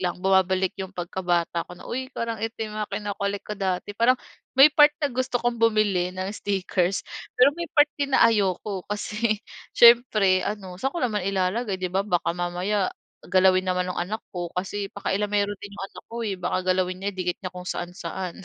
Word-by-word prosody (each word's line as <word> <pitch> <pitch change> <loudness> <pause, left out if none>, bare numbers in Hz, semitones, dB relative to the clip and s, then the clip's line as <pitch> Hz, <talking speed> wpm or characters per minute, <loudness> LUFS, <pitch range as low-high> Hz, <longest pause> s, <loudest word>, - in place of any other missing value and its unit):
lang, 180 -2 -1
bumabalik 190 -1 +3
‘yong 190 0 -5
pagkabata 175 -1 -1
ko - - -10
na, - - -13
"Uy, 260 +2 -3
parang 230 -1 -2
ito 225 0 -2
'yong 215 -1 -4
mga 210 - -3
kino-collect 200 -1 -3
ko 210 - -5
dati." 190 +1 -2
Parang 250 +2 +4 0.4
may 270 +3 +9
part 295 0 +6
na 290 - +1
gusto 250 -1 -1
kong 240 0 0
bumili 210 -5 +2
ng 185 +1 -4
stickers, 190 -2 -1 0.3
pero 255 +2 +6
may 345 - -3
part 295 0 +5
din 280 -1 -1
na - - +5
ayoko. 195 -2 0
Kasi 210 +1 -2 0.3
siyempre, 220 -6 +6
ano, 190 -4 -5
saan 270 +4 -1
ko 345 - -3
naman 210 -6 0
ilalagay, 195 +1 -1
‘di 185 - -1
ba, 195 +2 0
baka 175 -4 0
mamaya 180 +3 -1 0.3
galawin 185 0 +4
naman 180 -1 0
no'ng 180 - -3
anak 210 +6 -3
ko, 175 -2 -4
kasi 195 +2 -4
pakialamero 205 0 0
din 205 0 -10
‘yong 195 -1 -6
anak - - -13
ko, 230 - -8
eh. 200 -3 -2
Baka 180 0 -1
galawin 185 0 -1
niya 200 +1 -1
idikit 180 -1 -2
niya 185 - -5
kung 180 0 -9
saan-saan, 180 +1 -5
195 Hz, 190 wpm, -25 LUFS, 185-220 Hz, 0.4 s, may